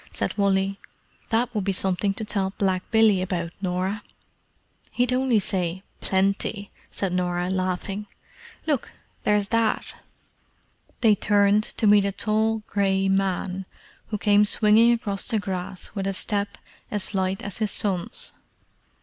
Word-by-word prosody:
said -, -, -2 dB
Wally. 195 Hz, -1 st, +1 dB, 0.5 s
"That 235 Hz, +2 st, +1 dB
would 210 Hz, -3 st, -1 dB
be 195 Hz, -, 0 dB
something 195 Hz, +1 st, 0 dB
to 220 Hz, -, -4 dB
tell 195 Hz, -2 st, -1 dB
black 190 Hz, -2 st, +1 dB
Billy 220 Hz, -4 st, +4 dB
about, 175 Hz, -2 st, -2 dB
Norah!" 190 Hz, +2 st, -1 dB, 0.9 s
"He'd 245 Hz, 0 st, +1 dB
only 255 Hz, -2 st, +2 dB
say 185 Hz, -2 st, -1 dB, 0.2 s
Plenty!" 200 Hz, +1 st, 0 dB, 0.2 s
said 190 Hz, -3 st, -2 dB
Norah, 180 Hz, 0 st, 0 dB
laughing. 190 Hz, +2 st, -2 dB, 0.6 s
"Look—there's 210 Hz, -7 st, -1 dB
Dad!" 230 Hz, -1 st, +1 dB, 1.2 s
They 225 Hz, -3 st, +6 dB
turned 205 Hz, +1 st, +3 dB
to -, -, +1 dB
meet 205 Hz, -1 st, +6 dB
a 200 Hz, -, 0 dB
tall 220 Hz, +2 st, 0 dB
grey 195 Hz, -1 st, +1 dB
man 190 Hz, -1 st, 0 dB, 0.4 s
who 215 Hz, -, -2 dB
came 205 Hz, 0 st, +4 dB
swinging 215 Hz, +2 st, +5 dB
across 205 Hz, -4 st, -1 dB
the 230 Hz, -, +1 dB
grass 185 Hz, -2 st, -5 dB
with 195 Hz, -2 st, -2 dB
a 195 Hz, -, 0 dB
step 200 Hz, +1 st, -2 dB, 0.3 s
as 205 Hz, -1 st, -3 dB
light 190 Hz, +3 st, -1 dB
as 205 Hz, 0 st, +1 dB
his 215 Hz, -2 st, +1 dB
son's. 200 Hz, -, -2 dB
200 Hz, 135 wpm, -25 LUFS, 190-215 Hz, 1.2 s, They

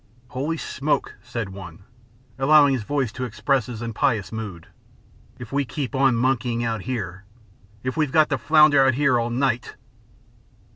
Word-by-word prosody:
"Holy 145 Hz, +6 st, -3 dB
smoke!" 150 Hz, -1 st, -2 dB
said 115 Hz, -5 st, -5 dB
one, 95 Hz, -2 st, -10 dB, 0.6 s
allowing 145 Hz, 0 st, +5 dB
his 130 Hz, -, -1 dB
voice 135 Hz, +1 st, -1 dB
to 130 Hz, -, -6 dB
express 130 Hz, 0 st, 0 dB
his 120 Hz, -2 st, -6 dB
impious 115 Hz, -4 st, -1 dB
mood, 105 Hz, -7 st, -6 dB, 0.7 s
"if 120 Hz, -2 st, -10 dB
we 140 Hz, +1 st, +1 dB
keep 135 Hz, +1 st, -5 dB
on 135 Hz, -2 st, +3 dB
monkeying 120 Hz, -1 st, 0 dB
out 115 Hz, -3 st, -2 dB
here! 100 Hz, -6 st, -5 dB, 0.6 s
If 130 Hz, 0 st, -3 dB
we've 155 Hz, -4 st, 0 dB
got 155 Hz, -1 st, +3 dB
to 135 Hz, -, 0 dB
flounder 150 Hz, +2 st, +5 dB
out 130 Hz, -2 st, +3 dB
here 135 Hz, -3 st, +3 dB
all 120 Hz, 0 st, -1 dB
night!" 125 Hz, 0 st, -1 dB
125 Hz, 155 wpm, -23 LUFS, 115-140 Hz, 0.7 s, allowing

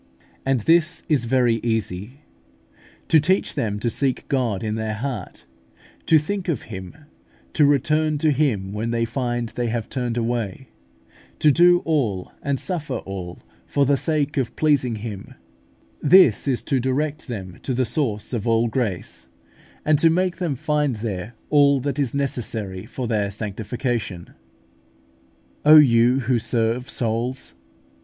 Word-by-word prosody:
And 135 Hz, -3 st, +2 dB
this 165 Hz, +5 st, +2 dB
is 145 Hz, -7 st, +1 dB
very 120 Hz, -2 st, +2 dB
easy. 110 Hz, +2 st, -3 dB, 0.9 s
To 160 Hz, -, +5 dB
teach 185 Hz, +6 st, +1 dB
them 105 Hz, -2 st, -2 dB
to 120 Hz, -, -1 dB
seek 135 Hz, 0 st, -1 dB
God 120 Hz, -6 st, 0 dB
in 110 Hz, -1 st, -2 dB
their 110 Hz, -1 st, -3 dB
heart, 115 Hz, -5 st, -6 dB, 0.6 s
to 160 Hz, -, +6 dB
think 185 Hz, +5 st, -2 dB
of 160 Hz, -9 st, -1 dB
Him, 95 Hz, -1 st, -8 dB, 0.6 s
to 150 Hz, -, +4 dB
return 150 Hz, +2 st, +2 dB
to 155 Hz, +1 st, +2 dB
Him 115 Hz, -10 st, 0 dB
when 110 Hz, +2 st, -2 dB
they 115 Hz, 0 st, 0 dB
find 120 Hz, -1 st, -2 dB
they 120 Hz, +1 st, -3 dB
have 115 Hz, -1 st, -3 dB
turned 125 Hz, -3 st, -2 dB
away, 115 Hz, 0 st, -3 dB, 0.7 s
to 150 Hz, -, +4 dB
do 175 Hz, +3 st, +5 dB
all 115 Hz, -, -1 dB
and 140 Hz, -2 st, -1 dB
suffer 155 Hz, -8 st, -3 dB
all 90 Hz, -3 st, -7 dB, 0.2 s
for 140 Hz, -, +2 dB
the 140 Hz, +1 st, +3 dB
sake 150 Hz, 0 st, 0 dB
of 130 Hz, -3 st, -1 dB
pleasing 140 Hz, -6 st, +2 dB
Him 105 Hz, -2 st, -7 dB, 0.7 s
this 145 Hz, -, +5 dB
is 130 Hz, -3 st, 0 dB
to 135 Hz, -, 0 dB
direct 145 Hz, +4 st, -2 dB
them 95 Hz, -7 st, -7 dB
to -, -, -4 dB
the 130 Hz, 0 st, +1 dB
source 115 Hz, -3 st, -2 dB
of 115 Hz, -2 st, -2 dB
all 115 Hz, +1 st, +3 dB
grace, 110 Hz, -7 st, -3 dB, 0.6 s
and 155 Hz, -1 st, +3 dB
to 165 Hz, -, +5 dB
make 180 Hz, +2 st, 0 dB
them 170 Hz, -6 st, -2 dB
find 150 Hz, -1 st, 0 dB
there 105 Hz, 0 st, -5 dB, 0.2 s
all 140 Hz, -2 st, +5 dB
that 140 Hz, +1 st, -3 dB
is 140 Hz, -2 st, -1 dB
necessary 110 Hz, -8 st, -3 dB
for 130 Hz, +1 st, -5 dB
their 105 Hz, -3 st, 0 dB
sanctification. 105 Hz, -1 st, -4 dB, 1.3 s
O 155 Hz, +1 st, +9 dB
you 125 Hz, -2 st, +5 dB
who 125 Hz, 0 st, +1 dB
serve 115 Hz, +2 st, -1 dB
souls! 120 Hz, -, -2 dB
125 Hz, 150 wpm, -22 LUFS, 110-145 Hz, 1.3 s, O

